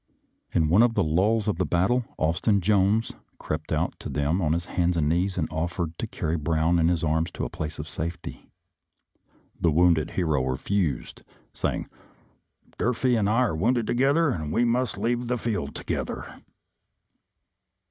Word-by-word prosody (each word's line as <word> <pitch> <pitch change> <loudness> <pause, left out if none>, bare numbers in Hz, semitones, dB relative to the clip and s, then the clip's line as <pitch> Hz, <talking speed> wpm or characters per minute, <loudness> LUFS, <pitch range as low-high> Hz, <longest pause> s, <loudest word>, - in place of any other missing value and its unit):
In 80 - +2
one 90 +8 +5
of 120 -1 +3
the 100 - +3
lulls 100 +7 +1
of 105 - 0
the 90 - +1
battle 95 - +2
Austin 85 +6 +2
Jones 100 +3 +2 0.3
crept 75 0 -5
out - - 0
to - - -6
them 75 +6 0
on 75 -3 +1
his 85 +1 -1
hands 90 0 0
and 75 -2 +1
knees 90 +4 0
and 80 - 0
offered 85 +1 -2
to - - -2
carry 80 +1 -2
Brown 80 +2 +1
in 80 - +3
his 85 -2 +1
arms 80 +1 +1
to - - -3
a - - -6
place 75 +1 -5
of 75 - -6
safety. 85 +2 -6 1.1
The 85 - +3
wounded 80 0 +3
hero 80 -7 +1
refused, 70 +2 -2 0.3
saying, - - -2 0.5
" - - -35
Durfee 125 +1 +1
and 105 -3 +1
I 115 +4 +3
were 80 - -3
wounded 115 +7 +1
together 140 +7 +2
and 80 -8 -3 0.2
must 125 -3 0
leave 120 +3 -1
the 125 +1 0
field 100 -12 -3
together." - - -5
85 Hz, 170 wpm, -26 LUFS, 80-110 Hz, 1.1 s, one